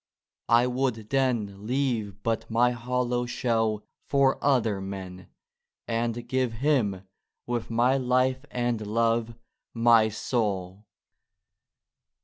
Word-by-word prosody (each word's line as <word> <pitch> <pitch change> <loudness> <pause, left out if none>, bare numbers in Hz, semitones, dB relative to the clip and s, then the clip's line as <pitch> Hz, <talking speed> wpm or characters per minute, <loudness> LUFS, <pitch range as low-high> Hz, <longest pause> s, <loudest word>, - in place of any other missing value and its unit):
I 120 +1 +5
would 125 -4 -2
then 110 -7 0
Leave 115 -6 -1
but 115 -1 -1
my 120 +2 +3
hollow 125 0 -1
shell 115 -3 0 0.2
for 140 -1 +2
other 115 -8 +2
men, 95 -1 -7 0.6
And 115 0 -2
give 130 -3 0
Him, 110 -7 0 0.4
with 120 -1 -3
my 120 +4 +3
Life 130 +1 +1
and 120 -3 -2
Love, 115 +1 +1 0.2
— - - -62 0.2
my 110 -1 +6
Soul! 105 -3 -2
115 Hz, 110 wpm, -27 LUFS, 110-125 Hz, 0.6 s, my